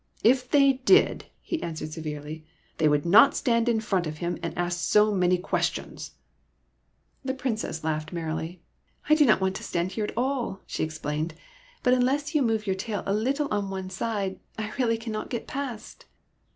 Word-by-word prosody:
If 250 +2 +4
they 275 -2 +4
did," 385 +9 +4 0.2
he 335 - -3
added 155 -2 -5
severely, 155 0 -6 0.2
'' - - -37
they 155 -1 +4
would 145 +1 +1
not 230 +11 +7
stand 235 -3 +2
in 230 -2 +2
front 190 -6 0
of 155 0 -5
him 175 +2 -3
and 165 - -4
ask 175 0 -1
so 210 +3 +4
many 180 -1 +3
questions! 180 +3 -3 0.5
" - - -44
The 265 0 -2
Princess 225 -11 -3
laughed 155 0 -2
merrily. 165 0 -4 0.2
'' - - -21
I - - +7
do 305 -1 +6
not 215 - +5
want 190 0 0
to - - -9
stand 175 +1 -1
here 215 0 -2
at 210 - -7
all," 250 -6 -1
she - - -3
explained; 155 0 -3 0.2
" - - -28
but 250 - +4
unless 270 +5 +1
you 300 - +3
move 225 -4 +1
your 190 -2 0
tail 205 +1 -4
a 195 - 0
little 270 +8 0
on 205 -2 -1
one 190 -1 -5
side, 195 -1 -2 0.2
I 215 0 -4
really 230 -3 +2
cannot 225 -2 -5
get 235 - -4
past." 265 -6 -6
210 Hz, 195 wpm, -26 LUFS, 170-250 Hz, 0.5 s, not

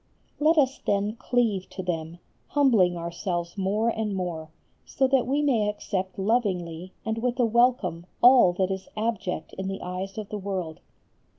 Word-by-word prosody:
Let 315 +2 +4
us 270 -2 +3
then 205 +2 0
cleave 230 -7 0
to 190 - -6
them, 165 -2 -3 0.3
humbling 225 -12 +3
ourselves 170 0 -3
more 205 +4 +1
and 220 -3 -2
more, 170 -4 -4 0.3
so 265 - 0
that 260 -2 +2
we 285 +3 +1
may 230 -8 +2
accept 190 -2 -3
lovingly 185 -5 -1
and 220 0 -1
with 250 +2 -1
a 245 - +5
welcome 225 -8 +2
all 245 -7 +7
that 185 +1 0
is 190 0 -4
abject 210 -7 -2
in 190 - -3
the 195 0 -4
eyes 185 +2 -5
of 215 -2 -5
the 210 - -4
world. 185 -4 -4
200 Hz, 165 wpm, -26 LUFS, 180-235 Hz, 0.3 s, all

